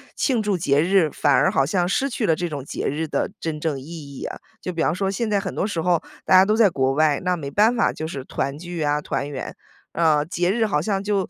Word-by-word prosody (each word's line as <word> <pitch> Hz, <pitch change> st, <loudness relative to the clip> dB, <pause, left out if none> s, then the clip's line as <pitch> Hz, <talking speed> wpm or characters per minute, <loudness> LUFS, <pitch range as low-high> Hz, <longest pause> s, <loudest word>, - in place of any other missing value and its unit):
庆 245 Hz, -6 st, +1 dB
祝 205 Hz, -2 st, +1 dB
节 145 Hz, -5 st, +2 dB
日， 175 Hz, 0 st, +3 dB
反 145 Hz, -2 st, +2 dB
而 -, -, +4 dB
好 135 Hz, -, +2 dB
像 175 Hz, +3 st, 0 dB
失 265 Hz, +8 st, +1 dB
去 240 Hz, -4 st, -2 dB
了 160 Hz, -, +3 dB
这 175 Hz, +2 st, -2 dB
种 145 Hz, -5 st, -5 dB
节 -, -, -5 dB
日 155 Hz, +3 st, -2 dB
的 155 Hz, -, -1 dB
真 160 Hz, -2 st, -3 dB
正 150 Hz, -3 st, -2 dB
意 -, -, -11 dB
义 145 Hz, -3 st, -9 dB
呀？ -, -, -5 dB, 0.3 s
就 185 Hz, -, -4 dB
比 165 Hz, -2 st, -1 dB
方 -, -, +2 dB
说 190 Hz, +2 st, -1 dB
现 220 Hz, +4 st, -2 dB
在 210 Hz, -2 st, +1 dB
很 -, -, -5 dB
多 -, -, 0 dB
时 185 Hz, -6 st, -2 dB
候 175 Hz, -1 st, +2 dB, 0.2 s
大 -, -, +4 dB
家 185 Hz, +1 st, +8 dB
都 215 Hz, +2 st, +2 dB
在 220 Hz, -3 st, +5 dB
国 135 Hz, -5 st, 0 dB
外， 150 Hz, 0 st, +2 dB
那 180 Hz, 0 st, +2 dB
没 145 Hz, -5 st, -6 dB
办 215 Hz, +8 st, +3 dB
法 235 Hz, -, +2 dB
就 155 Hz, -, -5 dB
是 140 Hz, -5 st, -6 dB
团 140 Hz, 0 st, -3 dB
聚 175 Hz, -1 st, -4 dB
啊、 145 Hz, 0 st, +1 dB
团 140 Hz, -, -3 dB
圆。 140 Hz, -2 st, -6 dB, 0.4 s
呃， 155 Hz, -3 st, +3 dB
节 175 Hz, +1 st, -1 dB
日 225 Hz, 0 st, +1 dB
好 150 Hz, -9 st, 0 dB
像 195 Hz, +2 st, -1 dB
就 200 Hz, -2 st, 0 dB
170 Hz, 285 characters per minute, -23 LUFS, 150-195 Hz, 0.4 s, 家